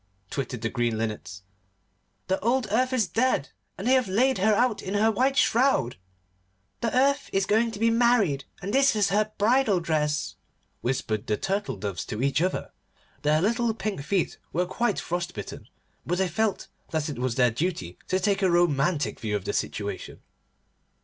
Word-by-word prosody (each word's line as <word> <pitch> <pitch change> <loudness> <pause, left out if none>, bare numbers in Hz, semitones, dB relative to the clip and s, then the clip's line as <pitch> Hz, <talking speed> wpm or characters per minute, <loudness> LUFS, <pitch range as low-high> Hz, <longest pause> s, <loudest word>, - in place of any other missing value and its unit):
twittered 130 -4 -4
the 115 - -1
green 120 -3 0
Linnets, 105 -3 -4 0.8
'the 190 +1 0
old 245 +3 +1
Earth 255 +4 +2
is 240 -6 +1
dead 225 - +1 0.3
and 195 - -6
they 255 - +4
have 255 -4 +3
laid 245 +5 +2
her 215 +2 +4
out 235 -1 +1
in 195 +1 -4
her 220 +2 +4
white 265 +5 +1
shroud.' 240 - +3 0.8
'The 235 +1 -1
Earth 280 +2 +2
is 195 0 +1
going 220 +3 +2
to 225 - -7
be 230 +2 +3
married, 225 - +3 0.2
and 200 +3 -3
this 275 -3 +4
is 205 -2 +2
her 215 +2 +1
bridal 220 -2 +3
dress,' 150 -3 -1 0.5
whispered 110 -4 -2
the 105 - +1
Turtle 200 - -2
doves 100 -3 -4
to 110 +4 -4
each 140 +2 +2
other. 185 +1 -1 0.5
Their 155 +2 +2
little 230 +1 +1
pink 205 -8 -3
feet 185 +5 -1
were 180 +3 0
quite 235 +6 -1
frost 175 +1 -3
bitten, - - -8 0.3
but 175 - -1
they 190 0 +2
felt 205 +4 -1 0.2
that 155 -2 -1
it 145 -5 -5
was 125 -2 -1
their 125 -2 +4
duty 115 - -3
to 185 - +1
take 195 +1 +1
a 190 - +3
romantic 170 -2 +1
view 105 -2 -2
of 100 - -3
the - - -2
situation. - - -4
190 Hz, 180 wpm, -26 LUFS, 140-225 Hz, 0.8 s, they